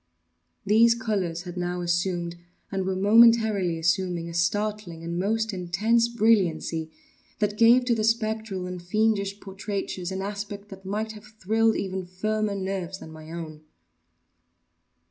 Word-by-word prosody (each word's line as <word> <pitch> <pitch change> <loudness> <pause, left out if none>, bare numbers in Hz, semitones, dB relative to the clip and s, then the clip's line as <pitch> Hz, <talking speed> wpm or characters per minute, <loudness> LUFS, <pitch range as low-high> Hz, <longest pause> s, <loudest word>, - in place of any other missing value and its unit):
These 230 +3 +5
colors 190 -7 -2
had 180 -1 -8
now 180 0 -2
assumed, 175 0 -1 0.4
and 190 -1 -2
were 190 - 0
momentarily 215 -3 +5
assuming, 170 0 0
a 170 - -7
startling 185 -1 -1
and 170 +1 -3
most 220 +3 0
intense 205 +6 +1
brilliancy, 190 -8 +1 0.5
that 210 -1 0
gave 235 +3 +6
to 245 - +2
the 220 -2 0
spectral 220 -4 0
and 180 -1 -6
fiendish 200 +1 0
portraitures 195 -2 -4
an 190 0 -3
aspect 205 0 -6
that 195 -1 -11
might 215 +3 -2
have 210 -1 -12
thrilled 220 +1 +1
even 190 -1 -3
firmer 215 +3 -1
nerves 190 -1 -3
than 160 - -11
my 155 0 -11
own. 160 -2 -7
195 Hz, 140 wpm, -26 LUFS, 175-215 Hz, 0.5 s, gave